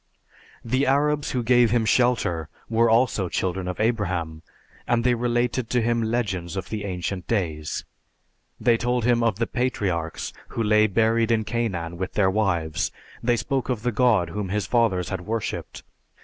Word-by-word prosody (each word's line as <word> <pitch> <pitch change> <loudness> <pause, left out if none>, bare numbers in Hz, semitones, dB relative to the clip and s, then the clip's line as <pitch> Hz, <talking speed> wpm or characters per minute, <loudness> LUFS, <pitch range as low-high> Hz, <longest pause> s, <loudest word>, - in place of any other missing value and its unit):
The 130 +4 +1
Arabs 145 +2 +2
who 125 -2 -1
gave 120 0 +4
him 115 0 +2
shelter 110 -9 +1 0.2
were 115 +1 +3
also 115 -5 +2
children 90 +1 -2
of 90 - -4
Abraham, 90 -8 -1 0.5
and 120 -1 +2
they 125 0 +3
related 120 0 0
to 125 - +2
him 120 0 +1
legends 100 -6 -2
of 95 - -4
the 105 -2 -4
ancient 90 -1 -4
days. 80 -9 -2 0.7
They 115 0 +3
told 120 0 0
him 120 -1 +3
of 115 -4 +1
the 115 - +1
patriarchs 100 -11 -2
who 115 - -3
lay 105 0 +4
buried 115 +2 +2
in 115 -1 +2
Canaan 95 -8 -2
with 95 0 -3
their 95 -2 +3
wives; 85 -6 0 0.3
they 120 0 +2
spoke 135 +3 -2
of 120 -4 -2
the 125 - +1
God 110 -7 +3
whom 100 -1 -3
his 105 +2 -1
fathers 110 -7 +1
had 95 -3 -3
worshiped. 110 +4 -4
110 Hz, 165 wpm, -24 LUFS, 95-120 Hz, 0.7 s, gave